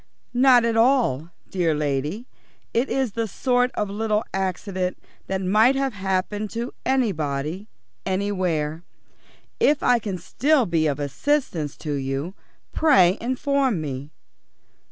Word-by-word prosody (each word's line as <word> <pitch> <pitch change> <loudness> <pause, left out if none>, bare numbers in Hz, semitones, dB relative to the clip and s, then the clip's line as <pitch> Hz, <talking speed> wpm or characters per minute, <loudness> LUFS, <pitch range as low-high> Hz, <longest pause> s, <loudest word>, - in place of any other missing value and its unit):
"Not 250 -1 +5
at 230 -1 +1
all, 225 - +2 0.2
dear 170 -4 +1
lady. 150 - -2 0.5
It 240 +4 +1
is 265 -4 0
the 230 +2 -2
sort 245 +4 +1
of 210 - -1
little 210 +2 0
accident 185 -1 -2 0.3
that 190 0 -2
might 215 +8 +4
have 270 -1 0
happened 195 +2 -2
to 235 +2 -4
anybody, 175 - -1 0.4
anywhere. 180 -6 -1 0.8
If 290 0 +3
I 245 -1 +4
can 200 -4 -4
still 270 - +2
be 165 -4 +1
of 145 -1 -1
assistance 155 - -1
to 150 - -1
you, 135 +5 -3 0.4
pray 210 - +4
inform 260 - 0
me. 140 -2 -5
200 Hz, 125 wpm, -23 LUFS, 160-245 Hz, 0.8 s, Not